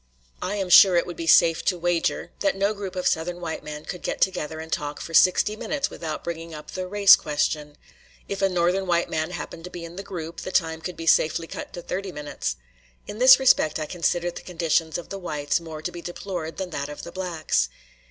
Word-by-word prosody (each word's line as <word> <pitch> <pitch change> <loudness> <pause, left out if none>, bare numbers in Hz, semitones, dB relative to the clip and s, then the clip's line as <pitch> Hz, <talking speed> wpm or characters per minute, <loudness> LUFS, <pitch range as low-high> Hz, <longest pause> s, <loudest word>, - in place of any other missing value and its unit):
I 195 - -2
am 190 -3 -2
sure 190 -1 +9
it 170 - +3
would 175 - -7
be 165 - -5
safe 165 0 +5
to 180 - +1
wager 175 -1 -1
that 195 -1 +1
no 200 +2 +1
group 200 -2 -6
of 180 - -3
Southern 175 +2 0
white 165 -2 -5
men 150 0 -7
could 180 - -6
get - - -3
together 160 -4 0
and 160 0 -5
talk 145 0 -3
for 165 - -8
sixty 185 +5 +4
minutes 280 +5 -2
without 155 -2 -5
bringing 165 -1 -6
up 150 - -10
the 185 -1 -4
"race 200 +1 +7
question." 150 0 -2 0.5
If 200 0 -4
a 195 - +3
Northern 180 +2 +1
white 170 -1 +1
man 160 +1 -1
happened 175 -2 -7
to - - -7
be 175 -1 -7
in 170 +2 -11
the - - -3
group, 170 -4 -7
the 185 - -6
time 160 -3 0
could 180 +2 -6
be 165 - -6
safely 160 0 +3
cut - - -7
to 175 - -7
thirty 190 +1 -4
minutes. 150 -2 -4 0.5
In 210 - -8
this 260 +1 +9
respect 250 -12 +4
I 155 - -3
consider 175 +1 -1
the - - -9
conditions 165 -2 0
of 175 - -9
the 195 - -5
whites 150 -4 -1
more 160 -2 -9
to - - -3
be 175 - -8
deplored 175 -2 -5
than 190 -2 -4
that 140 -2 -4
of 150 - -8
the 170 - -8
blacks. 165 - -1
170 Hz, 230 wpm, -24 LUFS, 160-185 Hz, 0.5 s, sure